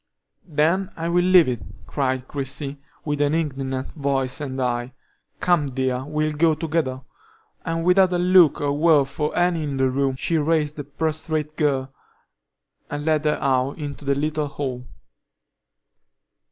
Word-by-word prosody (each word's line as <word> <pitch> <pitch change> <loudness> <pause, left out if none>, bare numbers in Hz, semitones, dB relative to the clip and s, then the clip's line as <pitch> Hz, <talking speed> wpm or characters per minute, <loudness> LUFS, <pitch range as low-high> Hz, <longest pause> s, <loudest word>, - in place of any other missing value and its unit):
"Then 170 +5 +1
I 165 +1 -2
will 175 +1 +3
leave 180 -3 +6
it!" 125 -3 -2 0.2
cried 130 -2 -2
Christie, 140 0 -5 0.3
with 145 -1 -1
an 145 +1 +2
indignant 135 -4 -2
voice 135 -1 -1
and 135 -2 -4
eye. 120 0 -1 0.5
"Come, 175 -5 +2
dear, 130 -1 -2
we'll 155 +1 -1
go 155 +1 +2
together." 150 -5 -2 0.6
And 165 0 -1
without 185 +1 +5
a - - +2
look 180 -2 +5
or 145 -1 +1
word 150 -1 +4
for 150 +2 -3
any 175 -2 +2
in 145 -3 -3
the 130 -1 +2
room, 135 0 0
she 160 +5 0
raised 150 -1 0
the 145 - -4
prostrate 155 +1 -2
girl, 135 -3 0 1.0
and 145 0 -4
led 155 -1 +1
her 150 - +2
out 135 0 +1
into 145 -2 -6
the 140 0 +1
little 150 +1 -1
hall. 130 -4 -5
145 Hz, 155 wpm, -23 LUFS, 135-160 Hz, 1.0 s, leave